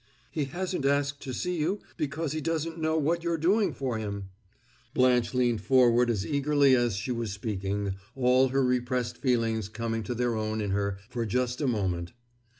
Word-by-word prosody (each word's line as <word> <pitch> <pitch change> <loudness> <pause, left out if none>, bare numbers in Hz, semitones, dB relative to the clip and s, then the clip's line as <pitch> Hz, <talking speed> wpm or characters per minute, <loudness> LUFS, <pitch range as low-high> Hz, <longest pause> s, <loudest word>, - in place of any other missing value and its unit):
"He 150 - -1
hasn't 180 +3 -3
asked 140 0 +1
to 130 - -5
see 180 +8 -2
you 175 +7 0 0.2
because 150 +1 -2
he 155 +1 -2
doesn't 165 +1 -2
know 160 0 +1
what 165 +3 +1
you're 170 -1 0
doing 195 +7 +2
for 125 -5 -3
him!" 100 -3 -5 0.6
Blanche 125 -1 +3
leaned 120 -4 +2
forward 125 0 +4
as 105 -3 0
eagerly 140 0 +3
as 120 -4 +1
she 110 +6 -3
was 115 -3 -2
speaking, 100 -1 -2 0.2
all 130 0 +4
her 135 +1 +1
repressed 125 -1 -1
feelings 115 -5 +1
coming 115 0 -3
to 120 +3 -4
their 120 0 0
own 110 0 -2
in 105 -2 -1
her 100 0 0
for 120 -1 -3
just 125 +4 -1
a 145 - +1
moment. 95 -7 -1
125 Hz, 180 wpm, -28 LUFS, 110-145 Hz, 0.6 s, forward